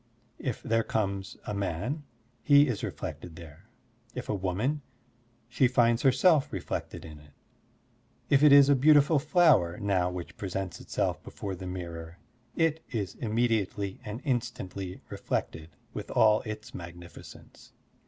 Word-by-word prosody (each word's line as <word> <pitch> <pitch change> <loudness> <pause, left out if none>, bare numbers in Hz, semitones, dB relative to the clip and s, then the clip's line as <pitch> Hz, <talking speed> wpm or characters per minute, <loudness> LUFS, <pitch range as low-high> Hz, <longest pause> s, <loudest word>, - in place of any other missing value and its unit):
If 125 -5 -4
there 115 0 +2
comes 100 -3 -2
a 105 - -3
man, 100 - -3 0.4
he 145 +3 +6
is 120 -6 -3
reflected 85 -2 -6
there; 85 +5 -13 0.5
if 125 - -6
a - - +1
woman, 105 +10 -1 0.7
she 125 +1 +3
finds 120 -1 +3
herself 145 +2 +4
reflected 95 -3 -5
in 75 -2 -10
it; 75 -1 -19 0.9
if 140 -1 +4
it 150 -1 +7
is 140 -1 +8
a 140 - +6
beautiful 145 +2 +5
flower 150 - +4
now 95 -3 +1
which 90 -1 -7
presents 95 -3 -4
itself - - -2
before 100 -2 -6
the 95 0 -7
mirror, 85 -2 -7 0.4
it 160 -1 +1
is 105 -6 -3
immediately 110 -3 -1
and 110 +2 -6
instantly 110 -8 -3
reflected 80 0 -3 0.2
with - - -6
all 110 -1 +4
its 110 0 -7
magnificence. 85 0 -11
105 Hz, 135 wpm, -29 LUFS, 90-130 Hz, 0.9 s, is